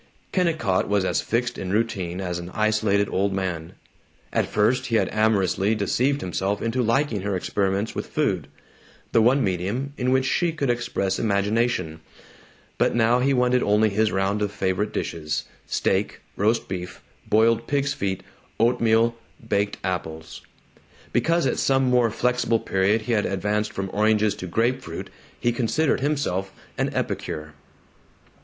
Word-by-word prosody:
Kennicott 160 - +1
was 100 -2 +2
as 90 - +1
fixed 125 +2 -1
in 95 - -4
routine 95 -5 -1
as 90 -2 -3
an 85 0 -7
isolated 110 -2 +2
old 100 +1 0
man. 90 -4 -3 0.6
At - - +1
first 105 +5 +1
he 115 - 0
had - - +2
amorously 105 -1 +2
deceived 130 +7 +1
himself 95 +3 -1
into 115 +3 -1
liking 115 -2 +1
her 100 0 -1
experiments 100 +3 -1
with - - -4
food - - -1 0.6
the 115 - +4
one 130 +5 +4
medium 100 +10 -2
in 125 0 +1
which 130 0 +3
she 170 +4 +1
could 140 -6 0
express 100 -5 -1
imagination 100 -5 0 0.8
but - - +2
now 120 +1 +3
he 135 +2 +2
wanted 125 -1 +3
only 105 +1 +3
his 110 +2 +1
round 95 +2 0
of 105 -1 0
favorite 100 +1 -1
dishes: 75 -2 -3 0.2
steak, - - 0
roast 110 +3 +1
beef, 90 -1 -6 0.3
boiled 110 +1 +3
pig's 140 -1 0
feet, 95 -5 -3 0.4
oatmeal, 115 0 +3 0.3
baked 100 0 0
apples. 80 -4 -4 0.7
Because 165 +7 +2
at 130 - 0
some 135 0 +3
more 125 -2 +3
flexible 125 +1 +1
period 100 +3 +1
he 120 - -3
had 105 -3 +2
advanced 105 +2 -1
from 95 -1 -4
oranges 110 0 +3
to 90 - -6
grape 120 +8 +1
fruit 85 -5 -7 0.3
he 120 - +2
considered 130 +6 +1
himself 130 -10 -1 0.2
an - - 0
epicure. 75 0 -3
110 Hz, 150 wpm, -24 LUFS, 95-120 Hz, 0.8 s, the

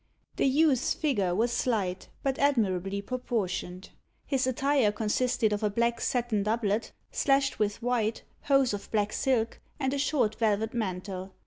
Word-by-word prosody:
The - - +3
youth's 275 -2 +3
figure 205 - 0
was 230 +4 +1
slight, 195 -8 -1
but 270 -1 -1
admirably 200 -8 +1
proportioned. 200 -7 -3 0.3
His 265 -2 0
attire 265 -3 +2
consisted 225 +1 +1
of 205 - -2
a 210 - +1
black 235 +2 0
satin 240 -4 0
doublet, 215 0 0 0.2
slashed 275 -3 +1
with 210 +2 -1
white, 230 -3 0 0.2
hose 275 -4 +3
of 205 - -6
black 210 -1 0
silk, 235 -4 0 0.2
and 265 -1 0
a 280 - -1
short 260 -7 +1
velvet 220 0 +1
mantle. 190 -3 -4
225 Hz, 145 wpm, -28 LUFS, 205-260 Hz, 0.3 s, The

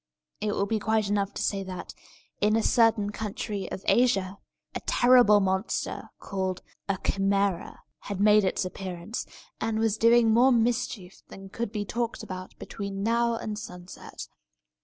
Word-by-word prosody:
It 210 0 -1
will 200 - 0
be 220 +2 -1
quite 220 -1 +1
enough 200 -1 0
to - - -2
say 200 -1 0
that, 185 -1 -7 0.5
in 210 +1 +3
a 225 - +2
certain 225 -3 +3
country 210 -1 -4
of 190 - -6
Asia, 200 -6 +2 0.3
a - - -3
terrible 245 -4 +6
monster, 190 +2 -2
called 190 -2 -3 0.3
a 195 - +2
Chimæra, 195 -1 0 0.2
had 200 -2 -6
made 210 0 +5
its 185 - 0
appearance, 185 +3 -5 0.3
and 225 -1 -1
was 220 -1 +1
doing 230 0 +5
more 245 +4 +5
mischief 230 -5 -1
than 195 0 -11
could 230 +1 -4
be 210 -2 -3
talked 235 +2 -3
about 185 0 -8
between 200 -1 -5
now 235 +1 +2
and 215 -2 -4
sunset. 180 -3 -9
205 Hz, 155 wpm, -27 LUFS, 195-225 Hz, 0.5 s, terrible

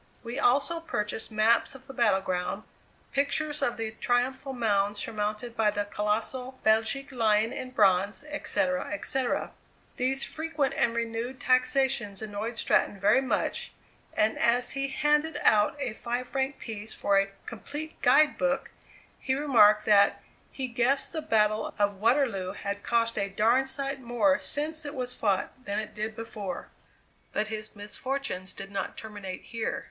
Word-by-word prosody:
We 240 +3 -4
also 280 +7 +2
purchased 220 -9 -3
maps 220 +4 +2
of 260 -1 -13
the 270 - -10
battle 215 -6 +3
ground, 185 +2 -2 0.5
pictures 295 +2 +1
of 240 -4 0
the 225 -1 -3
triumphal 245 +4 0
mound 205 -5 +1
surmounted 215 +2 -3
by 220 -2 +3
the 205 0 -1
colossal 220 +6 -2
Belgic 220 +6 +2
Lion 225 -1 +2
in 255 - -5
bronze, 200 0 +2
etc., 190 -11 -1
etc. 245 +5 -1 0.5
These 265 +2 +1
frequent 310 -4 -1
and 235 -3 +1
renewed 235 +2 -3
taxations 255 -5 +2
annoyed 220 +2 -4
Stratton 205 - +2
very 210 +7 +4
much, 265 - -1 0.4
and 215 +1 +2
as 240 +1 +3
he 275 0 -1
handed 295 +2 +1
out 215 +7 +4
a 260 -6 -2
five 245 +2 -3
franc 270 +1 -1
piece 215 -1 -6
for 200 -1 +3
a 195 0 0 0.2
"complete 295 +7 -7
guide 305 -2 +5
book," 270 0 0 0.5
he 260 - 0
remarked, 215 -7 +5
that 200 -1 +4 0.3
"he 265 -1 -3
guessed 250 +3 +1
the 320 - -2
battle 215 -6 +1
of 205 -1 +1
Waterloo 220 -4 +1
had 200 0 -4
cost 230 -1 +1
a 200 - -1
darned 230 +7 +3
sight 275 0 -3
more 245 +4 +2
since 310 +2 -2
it 285 0 -6
was 250 -1 -2
fought 200 -4 0
than 205 0 -2
it 215 -1 -4
did 215 +1 -4
before!" 220 -4 -6 0.6
But 215 0 0
his 215 0 -5
misfortunes 210 -2 -4
did 195 0 -8
not 195 -1 -4
terminate 205 -4 -7
here. 230 -1 -3
235 Hz, 150 wpm, -28 LUFS, 210-270 Hz, 0.6 s, guide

